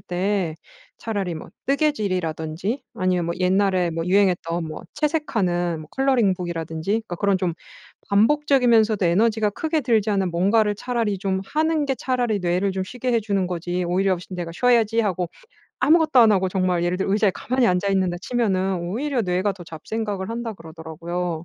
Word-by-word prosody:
때 185 -2 -1 0.4
차라리 200 -6 -3
뭐 160 - -8 0.2
뜨개질이라든지 200 - -1
아니면 180 -2 0
뭐 170 - -2
옛날에 185 -1 +2
뭐 165 +1 -3
유행했던 180 -3 +1
뭐 155 - -7
채색하는 190 - 0
뭐 155 - -11
컬러링북이라든지 180 - 0
그러니까 220 -5 -2
그런 200 +1 +2
좀 180 -3 -1 0.5
반복적이면서도 230 -2 +3
에너지가 215 +4 +2
크게 315 +8 -1
들지 225 -5 +1
않는 195 -3 +1
뭔가를 205 +5 +2
차라리 230 -4 -1
좀 190 0 -1
하는 310 +2 +1
게 270 -2 -1
차라리 245 -3 0
뇌를 180 +2 0
좀 190 0 -2
쉬게 250 +5 -3
해 235 - +4
주는 200 -3 -1
거지 180 0 -2
오히려 185 +2 +1
쉬 - - -13
'내가 175 -2 -5
쉬어야지.' 230 0 +3
하고 185 -5 -1 0.5
아무것도 315 -4 +4
안 225 -3 +7
하고 190 -2 +2
정말 185 -2 0
예를 175 +1 0
들어 195 - -1
의자에 210 -1 +3
가만히 255 +3 0
앉아 180 +2 +1
있는다 185 -2 +1
치면은 195 -5 0
"오히려 245 +10 -2
뇌가 185 +1 0
더 185 - -11
잡생각을 195 +4 -4
한다." 230 -1 -4
그러더라고요. 165 +1 -5
195 Hz, 395 characters per minute, -23 LUFS, 175-230 Hz, 0.5 s, 안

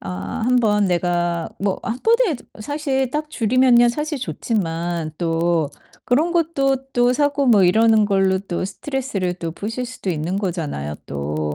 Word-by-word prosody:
아 90 - -5
1 250 +1 +3
번 210 -4 +3
내가 175 -1 0
뭐 195 -1 -1
1 235 +2 -3
번에 455 - +3 0.2
사실 270 +1 -1
딱 300 +2 -3
줄이면야 240 0 +4
사실 300 +4 -2
좋지만 170 - -2
또 165 -2 +1 0.4
그런 305 +8 +2
것도 305 -6 +1 0.2
또 245 0 +3
사고 285 -1 +1
뭐 210 -5 +6
이러는 220 +3 +4
걸로 195 -2 +2
또 185 -2 -3
스트레스를 200 -4 -3
또 170 -2 -5
푸실 225 +7 -4
수도 235 -6 -5
있는 165 +3 -2
거잖아요, 160 - -3
또. 75 +1 -3
210 Hz, 265 characters per minute, -21 LUFS, 175-260 Hz, 0.4 s, 뭐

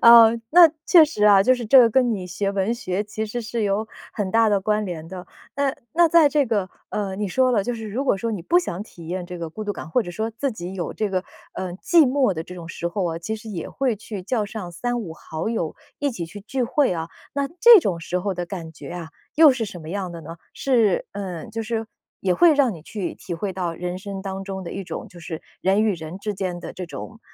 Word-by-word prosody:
呃， 230 -1 +9 0.2
那 340 0 +8 0.2
确 335 -4 +8
实 255 -9 -1
啊， 200 -2 +7
就 255 +5 +5
是 240 -3 -5
这 265 +5 +8
个 235 -2 +7
跟 245 0 +3
你 185 -3 -5
学 195 +2 -2
文 200 +2 0
学 190 -4 -2
其 215 +1 -4
实 235 +2 -4
是 225 0 -3
有 205 +2 0 0.3
很 200 -3 -2
大 225 0 +4
的 200 -2 +2
关 210 +1 0
联 165 -3 -6
的。 180 +1 -8 0.3
那 280 -1 +1 0.2
那 340 0 +5
在 320 -2 +6
这 285 -1 +2
个， 205 -5 0 0.2
呃， 200 -2 -2
你 210 -1 -2
说 255 +7 +3
了， 210 -4 +3
就 245 +3 -2
是 225 -1 -6
如 250 +7 -2
果 205 - +3
说 230 +4 -2
你 205 - -3
不 345 - +4
想 200 - -3
体 170 -6 -13
验 180 0 -3
这 180 0 -7
个 165 -1 -5
孤 215 +7 -6
独 205 - -1
感， 160 - -8
或 245 - +2
者 175 - -7
说 220 +5 -3
自 270 +5 -2
己 185 -5 -6
有 175 -3 -3
这 210 -2 -1
个， 185 0 -1 0.3
呃， 185 -2 -4
寂 320 - +4
寞 260 -4 +2
的 160 -2 -4
这 180 - -10
种 170 -2 -9
时 170 0 -3
候 185 +2 -2
啊， 165 -1 -2
其 220 +6 -4
实 220 0 -9
也 175 -5 -5
会 255 -5 -1
去 205 -1 -7
叫 215 +3 0
上 200 -4 -7
3-5 230 -1 -3
好 160 +3 -5
友 175 -9 -2 0.2
一 285 -1 0
起 175 -8 -5
去 205 +5 -10
聚 250 +5 -2
会 260 -2 +2
啊。 165 -1 -4 0.3
那 280 0 0
这 470 -1 +10
种 180 - -1
时 180 +2 -2
候 200 +2 -1
的 175 0 -4
感 170 -3 -7
觉 150 - -10
啊， 175 -2 -6 0.3
又 315 -1 +8
是 250 -3 -2
什 180 -5 -8
么 155 - -8
样 190 -1 -3
的 170 - -8
呢？ 165 +2 -8 0.2
是 230 -8 +2
呃， 185 -5 -5
就 225 +1 -4
是 225 0 -3 0.3
也 185 - +2
会 325 - +6
让 275 -5 +3
你 165 - -9
去 195 +1 -4
体 175 - -6
会 190 +4 -3
到 175 -2 -3
人 180 +1 -4
生 195 -1 -6
当 195 0 -4
中 190 -1 -5
的 170 - -6
一 195 - -4
种， - - -6
就 175 - -14
是 160 -1 -6 0.2
人 195 +3 +3
与 215 - +3
人 165 +2 -7
之 210 +1 -3
间 185 -3 -3
的 - - -7
这 180 -1 -6
种 225 +6 -9
205 Hz, 275 characters per minute, -23 LUFS, 180-235 Hz, 0.3 s, 这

